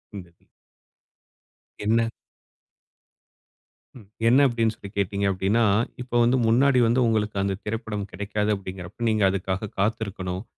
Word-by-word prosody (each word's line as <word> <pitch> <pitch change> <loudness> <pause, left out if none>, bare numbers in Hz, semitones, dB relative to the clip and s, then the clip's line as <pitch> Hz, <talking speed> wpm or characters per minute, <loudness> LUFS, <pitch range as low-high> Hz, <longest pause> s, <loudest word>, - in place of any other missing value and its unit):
இந்த 95 -3 -8
இதுல. 85 - -35 1.4
என்ன? 115 +1 +2 1.9
ம். 110 - -14 0.2
என்ன 130 +5 +6
அப்படின்னு 115 -3 0
சொல்லி 100 - -10
கேட்டீங்க 100 0 0
அப்படின்னா, 95 +5 +1 0.4
இப்ப 120 -1 -1
வந்து 120 +2 +3
முன்னாடி 130 +3 +4
வந்து 120 +3 +2
உங்களுக்கு 105 -2 0
அந்த 95 -1 -1
திரைப்படம் 105 -2 -4
கிடைக்காது, 105 +2 -2
அப்படிங்குறப்ப 95 +4 -6
நீங்க 110 -1 +1
அதுக்காக 95 +2 -3
காத்திருக்கணும். 100 -3 -2
105 Hz, 120 wpm, -24 LUFS, 95-115 Hz, 1.9 s, என்ன